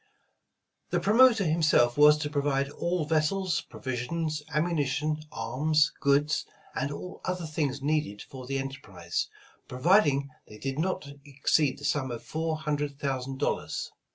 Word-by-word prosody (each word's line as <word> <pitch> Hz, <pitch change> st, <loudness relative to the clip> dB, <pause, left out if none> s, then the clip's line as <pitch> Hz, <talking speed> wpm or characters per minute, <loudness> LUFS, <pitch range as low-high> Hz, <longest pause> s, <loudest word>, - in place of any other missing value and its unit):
The -, -, +1 dB
promoter 225 Hz, +1 st, +5 dB
himself 155 Hz, -7 st, +3 dB
was 150 Hz, +1 st, +7 dB
to 150 Hz, -1 st, -3 dB
provide 140 Hz, -1 st, 0 dB
all 170 Hz, +1 st, -1 dB
vessels, 165 Hz, +4 st, +1 dB
pro -, -, -11 dB
visions, 150 Hz, +5 st, -2 dB
ammunition, 150 Hz, -1 st, 0 dB
arms, 150 Hz, +5 st, +1 dB
goods, 145 Hz, +2 st, +2 dB, 0.3 s
and 140 Hz, +2 st, -2 dB
all 180 Hz, +5 st, -7 dB
other 180 Hz, -2 st, -2 dB
things 145 Hz, -3 st, -2 dB
needed 145 Hz, -9 st, -1 dB
for 130 Hz, -2 st, -10 dB
the 135 Hz, +1 st, -1 dB
enterprise, 135 Hz, -11 st, -4 dB, 0.4 s
providing 140 Hz, -1 st, +3 dB, 0.2 s
they 105 Hz, -, -12 dB
did 135 Hz, +4 st, -4 dB
not 175 Hz, -3 st, -1 dB, 0.2 s
ex 140 Hz, -1 st, 0 dB
ceed 145 Hz, -4 st, +3 dB
the 145 Hz, -, -8 dB
sum 140 Hz, -3 st, 0 dB
of 120 Hz, -2 st, -6 dB
four 160 Hz, 0 st, -2 dB
hundred 145 Hz, -2 st, -2 dB
thousand 135 Hz, -1 st, -2 dB
dollars. -, -, -2 dB
145 Hz, 145 wpm, -28 LUFS, 135-155 Hz, 0.4 s, was